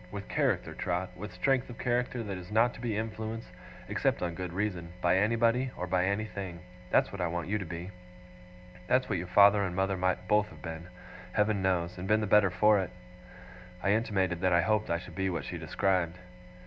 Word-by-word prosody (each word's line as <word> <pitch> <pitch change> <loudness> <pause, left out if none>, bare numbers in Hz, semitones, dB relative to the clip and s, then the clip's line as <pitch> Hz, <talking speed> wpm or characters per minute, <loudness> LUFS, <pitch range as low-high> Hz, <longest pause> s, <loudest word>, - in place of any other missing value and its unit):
With 100 -1 -6
character, - - 0
Trot 90 +1 -2
with 105 +3 -7
strength 135 -2 +1
of 120 - -9
character 125 0 -1
that 100 -3 -4
is 90 +1 -11
not 115 +3 +3
to - - -11
be 115 -4 -1
influenced, 110 +1 -4 0.4
except - - 0
on 85 -1 -1
good 90 0 -5
reason, 90 -3 -3
by 90 0 +3
anybody, 115 +4 +2
or 90 - -2
by 90 0 +1
anything. 100 -3 -3 0.3
That's - - +3
what 100 - -5
I 90 - +1
want 85 +1 -3
you 105 +1 0
to 95 - -5
be. 85 +3 -6 1.0
That's 130 +4 +3
what 95 -5 -1
your 90 - -5
father 100 +2 +6
and 90 -2 -2
mother 95 0 0
might 90 0 0
both 105 +1 +3
have 75 -1 -14
been, 80 +1 -6 0.5
Heaven 105 -1 +2
knows, 90 -1 0
and 90 - -5
been 110 +1 +4
the - - 0
better 105 -1 +5
for 105 +3 +4
it.' 95 -3 -2 0.9
I 100 - +3
intimated 95 -5 +1
that 95 -1 +3
I 85 - +5
hoped 105 +2 +1
I 85 - +2
should 90 0 -10
be 95 +3 -1
what 85 - -3
she - - -5
described. 90 -3 0
95 Hz, 210 wpm, -30 LUFS, 90-105 Hz, 1.0 s, father